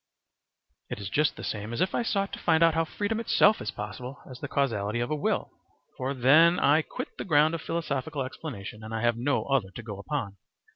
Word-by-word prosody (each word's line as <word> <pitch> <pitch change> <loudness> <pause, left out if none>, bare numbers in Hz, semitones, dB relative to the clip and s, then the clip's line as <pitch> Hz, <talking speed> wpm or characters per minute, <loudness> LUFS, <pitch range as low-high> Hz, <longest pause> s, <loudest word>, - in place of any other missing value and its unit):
It - - -4
is 100 -1 -5
just 150 +1 +2
the - - -9
same 105 +2 -4
as 120 - -3
if 185 - +1
I - - +1
sought 200 -4 -1
to - - -5
find 160 -1 +3
out 165 -1 +5
how 165 +1 +1
freedom 205 +6 -2
itself 215 -2 +4
is 105 - -3
possible 120 +6 -6
as 130 -1 -10
the 145 - -5
causality 115 -6 0
of 120 +3 -2
a - - +2
will. 150 - -1 0.4
For 130 +2 -3
then 155 +7 +6
I 150 +3 +4
quit - - -6
the - - -2
ground 155 -2 +4
of 165 - -3
philosophical 145 -5 -2
explanation, 115 -6 -7
and 110 +1 -5
I 110 - -2
have 120 -1 +3
no 130 +5 0
other 135 -8 +1
to 105 +5 -9
go 105 -3 -7
upon. 105 -4 -4
135 Hz, 225 wpm, -28 LUFS, 110-160 Hz, 0.4 s, then